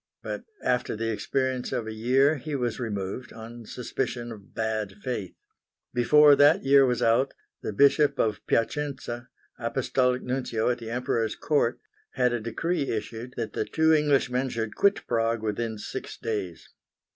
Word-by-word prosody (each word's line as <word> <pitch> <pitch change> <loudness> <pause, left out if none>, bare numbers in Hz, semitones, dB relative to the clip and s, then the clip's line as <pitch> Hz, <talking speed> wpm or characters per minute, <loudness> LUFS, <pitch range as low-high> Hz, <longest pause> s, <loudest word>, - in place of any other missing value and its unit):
But - - -5 0.2
after 125 -2 0
the 115 +1 -1
experience 130 +3 -1
of 115 - -2
a 110 - -5
year 130 +7 +3
he 150 +2 -5
was 120 -4 -2
removed 105 0 -4
on 115 0 -10
suspicion 125 -1 -3
of 105 -3 -12
bad 110 -3 -2
faith. 115 -8 -4 0.6
Before 145 +4 +6
that 145 +1 +5
year 135 0 +6
was 125 -1 0
out, 115 +4 +2 0.3
the - - -3
Bishop 140 +6 +4
of 110 -2 0
Piacenza, 125 -1 -1 0.3
Apostolic 125 +1 0
Nuncio 125 -2 0
at 120 - -3
the 115 -1 -7
Emperor's 120 -2 -1
Court, 145 -6 +1 0.3
had 125 -1 +2
a 120 - 0
decree 140 +8 -2
issued 115 +3 -4
that 115 -2 -3
the - - 0
two 160 0 +3
Englishmen 135 -4 +2
should 110 -3 -3
quit 200 +1 +2
Prague 115 -1 0
within 110 +1 -2
six 105 - -6
days. 100 -7 -4
120 Hz, 155 wpm, -27 LUFS, 110-135 Hz, 0.6 s, Before